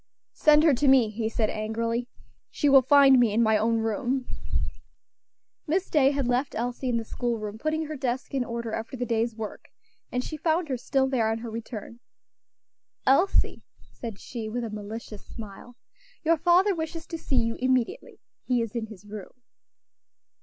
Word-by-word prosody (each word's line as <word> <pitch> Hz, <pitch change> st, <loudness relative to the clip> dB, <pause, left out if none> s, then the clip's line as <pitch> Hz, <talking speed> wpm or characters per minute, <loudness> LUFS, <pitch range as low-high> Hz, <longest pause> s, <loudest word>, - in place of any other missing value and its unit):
"Send 300 Hz, 0 st, +5 dB
her 315 Hz, -3 st, +6 dB
to 275 Hz, +3 st, +1 dB
me," 255 Hz, -5 st, +5 dB
he 220 Hz, +1 st, -2 dB
said, 220 Hz, -1 st, 0 dB
angrily. 230 Hz, +2 st, -2 dB, 0.4 s
"She 290 Hz, -, 0 dB
will 270 Hz, -1 st, +8 dB
find 270 Hz, 0 st, +6 dB
me 235 Hz, -3 st, +4 dB
in 225 Hz, +3 st, +3 dB
my 220 Hz, -1 st, +4 dB
own 225 Hz, +2 st, +2 dB
room." 240 Hz, +4 st, -1 dB, 1.4 s
Miss 360 Hz, +5 st, 0 dB
Day 280 Hz, -4 st, +5 dB
had 280 Hz, -3 st, -1 dB
left 250 Hz, +3 st, 0 dB
Elsie 245 Hz, +2 st, -2 dB
in 235 Hz, -, +1 dB
the 230 Hz, -, -2 dB
school 240 Hz, +1 st, -2 dB
room 215 Hz, 0 st, -6 dB
putting 310 Hz, +3 st, -1 dB
her 310 Hz, 0 st, -5 dB
desk 260 Hz, -1 st, -3 dB
in 265 Hz, -2 st, +1 dB
order 235 Hz, -2 st, -4 dB
after 225 Hz, +4 st, -4 dB
the 245 Hz, -, -2 dB
day's 230 Hz, 0 st, 0 dB
work, 220 Hz, -2 st, -7 dB, 0.4 s
and 250 Hz, 0 st, -1 dB
she 310 Hz, -, -6 dB
found 320 Hz, +1 st, 0 dB
her 260 Hz, -, 0 dB
still 265 Hz, +2 st, +1 dB
there 240 Hz, -5 st, +1 dB
on 225 Hz, -, 0 dB
her 230 Hz, 0 st, -7 dB
return. 230 Hz, 0 st, -7 dB, 1.1 s
"Elsie," 340 Hz, +9 st, +3 dB, 0.3 s
said 225 Hz, -4 st, -7 dB
she, 225 Hz, -3 st, -6 dB
with 240 Hz, +2 st, -3 dB
a 225 Hz, -, -4 dB
malicious 210 Hz, 0 st, -7 dB
smile, 225 Hz, +2 st, -10 dB, 0.5 s
"your 330 Hz, +1 st, +4 dB
father 360 Hz, +5 st, +4 dB
wishes 320 Hz, -1 st, -5 dB
to 330 Hz, -2 st, -6 dB
see 275 Hz, -, -2 dB
you 230 Hz, -2 st, +2 dB
immediately. 255 Hz, -, 0 dB, 0.2 s
He 245 Hz, -2 st, +1 dB
is 230 Hz, 0 st, -7 dB
in 225 Hz, -2 st, -2 dB
his 210 Hz, -2 st, -13 dB
room." 205 Hz, -2 st, -9 dB
245 Hz, 180 wpm, -27 LUFS, 225-275 Hz, 1.4 s, will